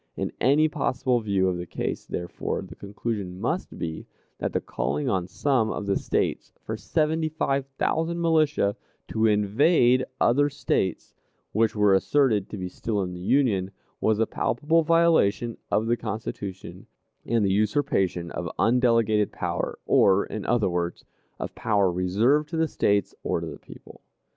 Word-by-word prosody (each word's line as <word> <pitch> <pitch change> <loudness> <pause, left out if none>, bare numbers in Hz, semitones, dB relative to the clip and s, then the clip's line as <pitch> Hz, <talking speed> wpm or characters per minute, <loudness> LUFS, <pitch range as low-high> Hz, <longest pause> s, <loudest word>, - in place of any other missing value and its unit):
In - - -2
any 145 +5 +4
possible 130 -4 0
view 100 -4 +1
of 90 -1 0
the 85 - -6
case, - - -4
therefore, 85 0 -4
the - - -10
conclusion 100 -2 -5
must - - -3
be, 80 -1 -5 0.3
that - - -2
the - - 0
calling 70 +5 -2
on 90 -3 0
some 120 +3 +1
of 105 - -4
the 100 -1 +1
States - - -1
for - - -5
seventy 155 +1 0
five 140 -3 -1
thousand 165 +2 0
militia 155 -10 +2 0.3
to 110 0 +2
invade 120 - +3 0.2
other 145 +4 +3
States 95 - -2 0.4
which 110 +1 +1
were 105 -2 +4
asserted 110 0 +2
to 105 - -6
be 90 -1 -4
still 105 +2 -2
in 90 -1 -5
the 90 - -8
Union, 100 -4 +2 0.3
was 110 -1 +2
a 115 - +2
palpable 150 +11 +1
violation 155 -10 +3
of 105 +2 +1
the 120 +1 +1
Constitution, 100 -3 -6 0.4
and 115 -2 +1
the 95 - +2
usurpation 100 -6 0
of - - -4
undelegated 115 -3 +3
power, - - -3
or, 95 +1 +4
in 110 - -6
other 120 -3 +2
words, 85 -1 -3 0.3
of - - -5
power 100 -4 +1
reserved 110 - +2
to 165 - -3
the 160 0 +2
States 100 -8 +1
or - - -1
to 85 - -5
the 80 - -8
people. - - -14
110 Hz, 160 wpm, -25 LUFS, 95-140 Hz, 0.4 s, any